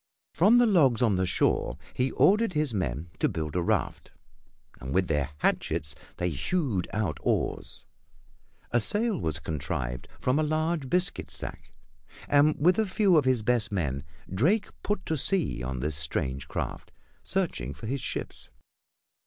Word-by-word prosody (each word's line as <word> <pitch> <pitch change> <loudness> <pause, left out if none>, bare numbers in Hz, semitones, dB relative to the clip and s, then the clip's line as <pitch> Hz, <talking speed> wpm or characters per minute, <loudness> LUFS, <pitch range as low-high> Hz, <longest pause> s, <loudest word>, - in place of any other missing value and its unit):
From 205 +9 +5
the 245 - +6
logs 140 - +4
on 110 -4 +3
the 95 0 +1
shore 65 - +1 0.2
he 130 +1 0
ordered 210 0 +4
his 150 -5 0
men 85 - -3
to - - +2
build 75 -1 -4
a 90 - +2
raft, - - -1 0.7
and 65 +2 -5
with 95 -1 +2
their 75 -2 0
hatchets 75 0 0 0.2
they 90 - 0
hewed 105 - -1
out 95 -9 -1
oars. - - -2 0.9
A 120 - +3
sail 210 - +3
was 80 -3 -1
contrived 65 -5 -4
from 130 +4 +1
a - - +2
large 155 -2 -1
biscuit 180 +5 +1
sack, - - -6 0.6
and 145 +2 +4
with 180 +7 +4
a 220 - +2
few 190 -1 +3
of 150 -4 +4
his 130 -4 +2
best 115 -3 +1
men 70 -8 -1 0.3
Drake 170 - +2
put 205 -2 -2
to 160 - -1
sea 170 - +1
on 65 0 -4
this 75 +1 -1
strange 70 -2 -2
craft, - - -5 0.3
searching - - -1
for 70 +9 -9
his 130 +4 -2
ships. - - -4
120 Hz, 160 wpm, -28 LUFS, -, 0.9 s, the